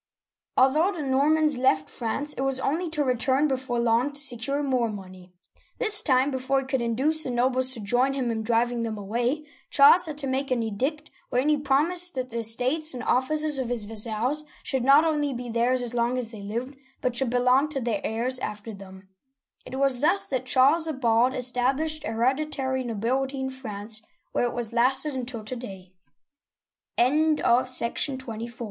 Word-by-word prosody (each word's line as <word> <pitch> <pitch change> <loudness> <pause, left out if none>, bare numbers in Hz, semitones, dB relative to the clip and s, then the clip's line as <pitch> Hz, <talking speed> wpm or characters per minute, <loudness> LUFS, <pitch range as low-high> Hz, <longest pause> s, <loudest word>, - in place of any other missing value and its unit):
Although 305 +9 +3
the 325 -5 -5
Normans 290 +1 +2
left 155 -12 +2
France, 285 +5 -3
it - - -6
was 270 -1 0
only 325 +6 -1
to 305 -2 -1
re 255 -2 +1
turn 265 +4 +1
before 260 -3 -3
long 235 +3 +1
to 285 - 0
secure 275 +1 +1
more 255 -4 0
money. 185 -3 -10 0.5
This 425 -1 +4
time, 265 - +2
before 265 +1 0
he - - -9
could 265 -1 -1
induce 265 +7 +1
the - - -4
nobles 255 +1 +1
to - - -8
join 245 +6 +1
him 255 -3 -2
in 220 -1 -3
driving 235 +1 0
them 225 -2 -4
away, 240 +9 -2 0.2
Charles 330 +5 +6
had 305 -2 -6
to 295 - -5
make 270 +1 -2
an 245 -3 0
edict, 270 +9 -3 0.2
wherein 255 +4 0
he 300 - +3
promised 340 +6 +2
that 255 -1 -4
the 235 - -3
estates 255 +7 +3
and 245 - -6
offices 300 +4 +1
of 250 -2 -3
his 240 -3 -1
vassals 225 +7 -2 0.2
should 265 -3 -1
not 280 +4 +5
only 295 -3 0
be 245 0 -6
theirs 245 +2 +1
as 240 -1 -3
long 240 +1 0
as 235 -3 -2
they 215 -3 -9
lived, 235 +7 -5 0.3
but 250 -1 -1
should 265 0 +1
belong 250 +4 +2
to 290 -3 -3
their 230 -5 -2
heirs 245 +4 -1
after 210 -1 -6
them. 190 -1 -13 0.6
It - - -7
was 270 -2 +2
thus 350 +7 +2
that 260 -1 -3
Charles 280 +6 +4
the 320 - -2
Bald 245 0 +1
established 265 +5 0
hereditary 260 +3 -1
nobility 255 +4 -2
in 265 0 -3
France, 220 -4 -5 0.3
where 245 - 0
it - - -9
has 235 -2 -3
lasted 265 +5 +2
until 245 -3 -5
to 255 - -5
day. 190 -6 -10
255 Hz, 180 wpm, -25 LUFS, 235-280 Hz, 0.6 s, Charles